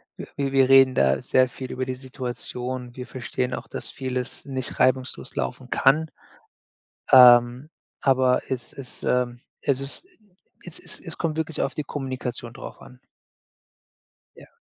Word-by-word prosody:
wir - - -8
wi 140 -1 -1
wir 135 -1 +4
reden 135 -1 +7
da 65 0 +3
sehr 130 -1 +3
viel 130 0 -8
über 130 0 -3
die 130 0 -3
Situation. 125 -1 -6
Wir 125 0 -7
verstehen 125 0 -3
auch, - - -5
dass - - -6
vieles 130 -1 -5
nicht 130 -2 -5
reibungslos 130 0 0
laufen 65 - -4
kann, 155 +4 +3 1.0
ähm, 125 +1 +7 0.3
aber 130 -2 +3
es 130 -2 -4
es, 135 -2 -7
ähm 125 -1 0 0.2
es 135 -1 0
ist 140 - -4 0.6
es - - -9
es - - -9
es - - -7
kommt 160 -2 -1
wirklich 160 -1 -2
auf - - -1
die 150 - -3
Kommunikation 130 -4 -5
drauf - - -10
an. 125 0 -15 1.4
Ja. - - -16
130 Hz, 150 wpm, -24 LUFS, 125-135 Hz, 1.4 s, reden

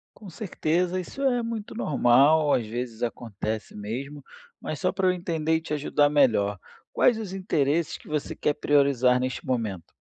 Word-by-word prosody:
Com 205 - -12
certeza 180 -1 -1
isso 230 +10 -6
é 250 -3 +2
muito 230 -2 -5
normal, 145 - +4
às 120 - +1
vezes 120 0 -5
acontece 110 -2 -4
mesmo, 130 +8 -6 0.4
mas 155 - -5
só 185 - +1
para 190 -1 0
eu - - +5
entender 165 -3 -1
e 160 - 0
te 160 - -5
ajudar 145 0 +2
melhor, 110 -9 +2 0.3
quais 240 - +4
os 210 -4 -6
interesses 165 -4 0
que - - -18
você 150 -1 -3
quer 150 - 0
priorizar 140 -4 +3
neste 130 0 -3
momento? 110 -9 -3
145 Hz, 165 wpm, -26 LUFS, 125-175 Hz, 0.4 s, eu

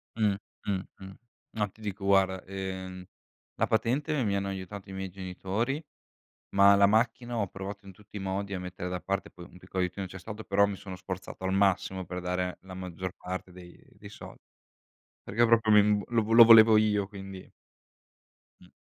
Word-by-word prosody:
Mh, 105 -3 +2 0.3
mh, 100 -2 0 0.2
mh. 95 0 -10 0.5
Ma 105 -1 +1
ti 105 +3 -20
dico 100 -1 -5
guarda, 95 -1 +3
ehm, 95 -1 -6 0.5
la - - +1
patente 130 +6 0
mi 100 -3 0
hanno 100 0 -1
aiutato 95 +1 -7
i - - -7
miei 95 0 -5
genitori, 95 - -3 0.7
ma 100 0 +7
la 100 0 +6
macchina 120 +3 +1
ho 105 -3 0
provato 95 +2 -8
in 95 - -10
tutti 105 +2 -15
i - - -4
modi 95 +1 -3
a - - -2
mettere 90 0 -6
da 90 0 -4
parte, 100 0 -3
poi 90 - -12
un 90 - -16
piccolo 95 +1 -3
aiutino 90 +2 -3
c'è 95 +1 -9
stato 110 +3 -8
però 100 +1 +3
mi 100 -1 -4
sono 95 -1 -8
sforzato 95 0 -7
al 95 - 0
massimo 95 -1 +1
per 90 +1 -5
dare 90 0 -2
la 95 0 -10
maggior 90 0 -6
parte 95 0 -6
dei 90 -1 -14 0.2
dei - - -11
soldi. - - -12 0.8
Perché 115 +4 +2
proprio 115 -1 +3
mi 105 0 +5
lo 115 -2 0
lo 115 0 +11
volevo 110 -1 +9
io, 105 -2 +2
quindi 95 -2 -10 1.1
Mh. - - -17
95 Hz, 185 wpm, -29 LUFS, 95-105 Hz, 1.1 s, lo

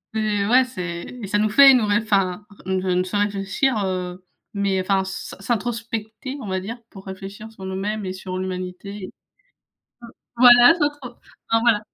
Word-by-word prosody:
heu, 210 -2 0
ouais, 255 +2 +6
c'est 180 -8 -5 0.2
et 205 - -5
ça 205 +2 0
nous 215 +1 +2
fait 270 +5 +8
nous 245 -4 +3
ré 205 0 +2
enfin, 195 -2 0 0.2
ré 190 0 -1
ça 180 - +2
nous 180 - +1
fait 195 +3 -2
réfléchir, 205 +4 0
heu 185 -1 -4 0.3
mais 200 -2 0
enfin, 190 0 +1
s'in 190 0 -7
s'introspecter, 230 +3 -4
on 215 - -7
va 190 -1 -1
dire, 220 +6 -6
pour 195 -2 -13
réfléchir 195 +3 -8
sur 190 - -12
nous-mêmes 200 +2 -3
et 185 - -3
sur 185 -1 -6
l'Humanité. 185 +1 -6 1.3
Voilà, 245 +3 +8
s'introp 290 -6 -3 0.3
enfin, 225 - +3
voilà. 230 -3 +3
205 Hz, 170 wpm, -22 LUFS, 190-230 Hz, 1.3 s, fait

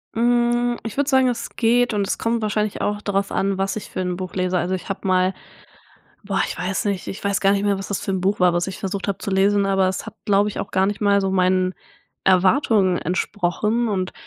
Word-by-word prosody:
Hm, 240 +1 +2
ich 225 - -6
würde 285 0 +1
sagen, 265 -1 +4
es 245 - -2
geht, 245 0 +2
und 200 -1 0
es - - -1
kommt 230 0 -1
wahrscheinlich 210 -1 -1
auch 205 0 -1
darauf 200 -1 -1
an, 195 0 0
was 195 0 -1
ich 215 - -6
für - - -6
'n 180 -1 -2
Buch 185 -1 -6
lese. 185 -1 0
Also, 175 +2 -1
ich 185 - -8
habe 195 0 -4
mal 185 0 +2 0.9
boah, 195 -1 -1
ich - - -6
weiß 185 +4 -2
nicht 200 -3 -2
ich 195 - -6
weiß 200 -1 0
gar 195 0 +4
nicht 200 0 0
mehr, 200 -1 +1
was 195 - -6
das 200 - -2
für - - -4
'n 190 -1 -1
Buch 195 +2 0
war, 180 -1 +5
was 175 0 0
ich 190 - -6
versucht 195 0 -4
habe 200 - -1
zu - - -5
lesen, 200 +1 +3
aber 195 -1 +2
es 185 -1 -4
hat, - - -8
glaube 205 0 +3
ich, 210 - -6
auch - - -4
gar 190 +1 +2
nicht 205 +1 -3
mal 200 -1 +3
so 195 -1 -1
meinen 185 0 +2 0.5
Erwartungen 190 - +3
entsprochen 205 +6 -1
und 185 -3 -2
195 Hz, 245 wpm, -22 LUFS, 185-210 Hz, 0.9 s, war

